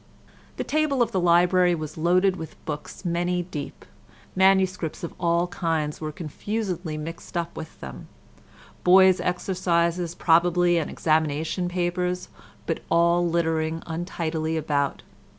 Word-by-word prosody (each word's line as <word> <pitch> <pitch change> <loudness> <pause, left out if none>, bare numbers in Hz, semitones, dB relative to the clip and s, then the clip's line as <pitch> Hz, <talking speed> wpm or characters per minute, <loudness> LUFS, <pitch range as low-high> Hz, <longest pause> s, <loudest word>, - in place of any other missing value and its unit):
The - - -1
table 300 -4 +1
of - - -4
the 190 - 0
library 175 +1 +4
was 155 -2 -6
loaded 180 +4 +3
with 160 -3 -8
books 150 +5 -6
many 175 +1 0
deep; 160 -5 -7 0.5
MSS. 190 -4 +2
of 170 - -5
all 170 0 +2
kinds 160 -4 -2
were 155 -1 -3
confusedly 180 +1 -4
mixed 165 +3 -6
up 170 0 -3
with 160 0 -9
them,—boys' 180 - +1
exercises, 175 -2 0
probably, 175 +1 +3
and 155 - -3
examination 160 +3 0
papers—but 180 0 -3
all 170 +1 +3
littering 165 -1 0
untidily 160 -1 -3
about. 145 -2 -1
170 Hz, 115 wpm, -25 LUFS, 160-180 Hz, 0.5 s, library